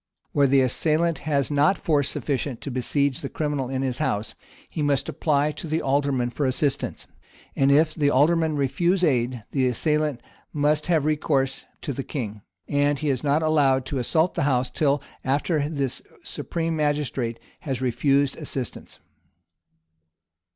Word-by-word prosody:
Where 140 -1 +3
the 135 0 +4
assailant 155 +5 +1
has 140 -1 +1
not 145 +6 +3
force 145 -4 +1
sufficient 140 -3 -2
to 140 - -5
besiege 130 +2 0
the 135 - -4
criminal 145 -4 -2
in 135 0 -2
his 130 -2 -2
house, 105 +1 -1 0.3
he 155 - -5
must 140 -2 +1
apply 150 -1 +1
to 165 - -7
the 160 +1 0
alderman 135 -3 +1
for 140 +2 -1
assistance; 135 +2 -1 0.5
and 135 0 +3
if 155 +2 +4
the 145 -3 +2
alderman 155 +3 +3
refuse 170 +7 +1
aid 125 -6 +1
the 130 -2 +2
assailant 150 +1 0 0.3
must 150 +1 +1
have 160 -5 +2
recourse 140 -3 0 0.2
to 140 - -3
the 135 - -3
king; 110 -7 -5 0.3
and 145 0 +2
he 150 0 0
is 130 0 -2
not 145 +2 +2
allowed 140 -4 +3
to 135 0 -3
assault 160 +8 +1
the - - -2
house 125 -1 +1
till 145 -2 +1 0.2
after 145 +2 0
this 140 -5 -2 0.2
supreme 165 -1 -3
magistrate 145 -6 -1 0.2
has 135 -7 -3
refused 135 +2 +2
assistance. 135 -6 -6
140 Hz, 155 wpm, -24 LUFS, 130-150 Hz, 0.5 s, the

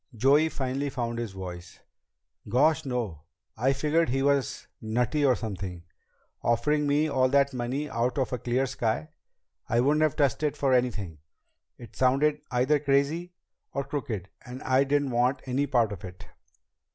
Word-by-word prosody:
Joey 140 +7 +4
finally 135 0 -2
found 120 -3 -3
his 115 -4 -4
voice. 90 -2 -8 0.7
"Gosh, 145 +8 +3
no! 115 - -3 0.3
I 130 +4 +2
figured 150 +4 +1
he 135 +2 0
was 140 -1 +1 0.2
nutty 120 +6 0
or 130 -3 +4
something. 95 -6 -5 0.6
Offering 145 +6 +1
me 145 +2 +2
all 130 -3 +2
that 140 0 +3
money 130 +4 -2
out 120 +2 -1
of 130 -2 -1
a 125 - -2
clear 125 +4 0
sky. 125 +2 -2 0.6
I 115 - +2
wouldn't 145 +5 +3
have 155 -2 +2
touched 140 -1 +1
it 150 -2 0
for 135 -2 +2
anything. 105 -10 0 0.6
It 120 -4 -13
sounded 140 +4 +2
either 130 +4 +2
crazy 145 +5 0 0.4
or 140 - -1
crooked, 125 -9 -4
and 125 +1 -9
I 130 +1 +3
didn't 140 -1 +1
want 125 +3 +1
any 135 +2 0
part 120 -5 +2
of 95 -3 -7
it." 90 -1 -9
130 Hz, 160 wpm, -27 LUFS, 120-140 Hz, 0.7 s, Joey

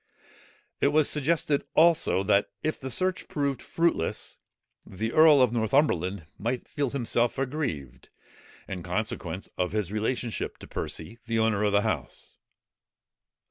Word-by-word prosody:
It - - +3
was 150 +1 +4
suggested, 150 -1 +2
also, 160 - +4
that 100 0 +2
if 155 - -1
the 130 - -5
search 185 +7 -1
proved 140 -3 -2
fruitless, 165 - -1 0.5
the 110 +5 -4
earl 155 -4 +7
of 120 -2 +1
Northumberland 105 - +1
might 120 +3 -2
feel 145 -4 -2
himself 120 -2 0
aggrieved, 125 - -4 0.6
in 95 -2 -5
consequence - - -3
of 90 +1 0
his 105 -4 -1
relationship 110 +2 -2
to - - -12
Percy, 115 - -6
the 115 0 0
owner 110 -2 +2
of 105 - +2
the 100 0 +3
house. 75 - -4
120 Hz, 135 wpm, -27 LUFS, 100-145 Hz, 0.6 s, earl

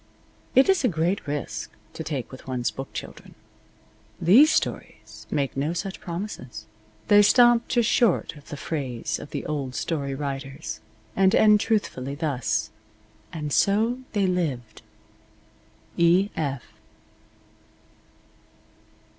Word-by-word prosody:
It 265 - +6
is 385 -4 +3
a - - +4
great 170 0 -1
risk 140 -7 -4 0.2
to 160 - -6
take 140 -7 -4
with 130 - -12
one's 125 -2 -1
book 135 0 -7
children. - - -9 0.8
These 250 - +6
stories - - -3
make 140 -2 -1
no 145 +5 -1
such 190 +2 -5
promises. 170 - -6 0.4
They 205 -1 +7
stop 240 +2 +5
just 240 -3 +2
short 225 -8 +2
of 145 - -15
the 145 - -6
phrase 135 -7 -3
of - - -9
the - - -5
old 140 -4 -3
story 140 -5 -2
writers, 135 -1 -5 0.4
and 190 0 +4
end 210 -1 +6
truthfully, 140 - -1
thus: 130 -8 -1 0.6
And 150 -3 -4
so 225 +5 +2
they 205 -2 +2
lived. 150 -11 -2 1.2
E. 175 +4 +4
F. 140 -5 -2
160 Hz, 120 wpm, -25 LUFS, 135-200 Hz, 1.2 s, They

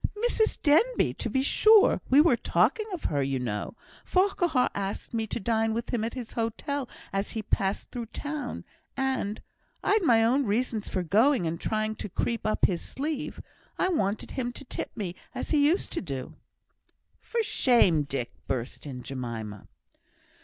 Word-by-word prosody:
"Mrs 440 -2 +1
Denbigh, 345 +12 +3
to - - -1
be 265 0 +1
sure. 430 +8 +5
We 275 +3 +7
were 305 -6 +5
talking 435 - +1
of 360 -4 -5
her, 145 -2 0
you 135 0 0
know. 115 - -3 0.3
Farquhar 350 -8 +2
asked 200 +3 -4
me 225 -1 -1
to - - -3
dine 225 +1 +1
with 235 +2 -4
him 230 -3 +1
at 230 +2 -3
his 245 -4 -6
hotel 250 +4 -2 0.2
as 195 +1 -1
he 220 - -2
passed 195 -1 -1
through 240 -3 -5
town, 290 +5 -5 0.3
and 265 -6 -1 0.4
I'd 420 +2 +3
my 230 -9 +5
own 260 +2 +2
reasons 220 0 -1
for 185 - -1
going 215 - +3
and 165 +1 -3
trying 215 0 0
to - - -5
creep 230 +5 -1
up 215 - +3
his 175 -3 0
sleeve 300 +2 -4 0.3
I 375 - +2
wanted 210 - -1
him 245 -2 -2
to - - -8
tip - - -4
me, 190 -5 -3 0.2
as 255 - -4
he 295 -2 +4
used 345 +6 +1
to - - -2
do." 135 -7 -5 0.9
"For 465 -1 -1
shame! 235 - +4
Dick," 135 -4 -3 0.2
burst 130 +2 -4
in 125 -3 -7
Jemima. 115 -6 -6
230 Hz, 170 wpm, -28 LUFS, 185-285 Hz, 0.9 s, We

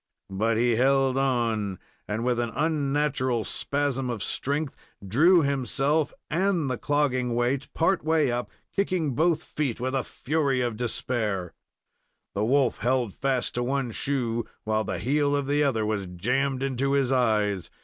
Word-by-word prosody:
But 110 +4 +1
he 120 -1 +2
held 135 +1 +3
on, 115 -7 0 0.3
and 110 +2 -2
with 120 -1 +1
an 120 -1 0
unnatural 145 -5 0
spasm 140 -1 -1
of 115 -4 -3
strength, 145 +1 -2 0.3
drew 165 - +5
himself 140 +2 +1 0.2
and 170 -4 +1
the 125 - -3
clogging 130 -5 +1
weight 125 +3 0
part 175 +3 +2
way 155 -4 +2
up, 120 0 -2 0.3
kicking 185 -7 0
both 160 +4 +2
feet 140 -7 -3
with 130 +2 -2
the 135 -2 +1
fury 140 -2 -1
of 120 -3 -1
despair. 110 -5 -2 0.8
The 100 - -1
wolf 135 +1 +2
held 120 -2 0
fast 135 -2 -1
to 120 - -1
one 130 -1 -1
shoe, 120 -2 -1 0.2
while 110 0 0
the 95 -3 -3
heel 145 - +1
of 140 -1 0
the 145 +2 +1
other 115 -6 +1
was 105 -3 -2
jammed 130 +9 -1
into 135 +1 0
his 135 -2 +2
eyes. 105 -8 +1
130 Hz, 155 wpm, -26 LUFS, 115-145 Hz, 0.8 s, drew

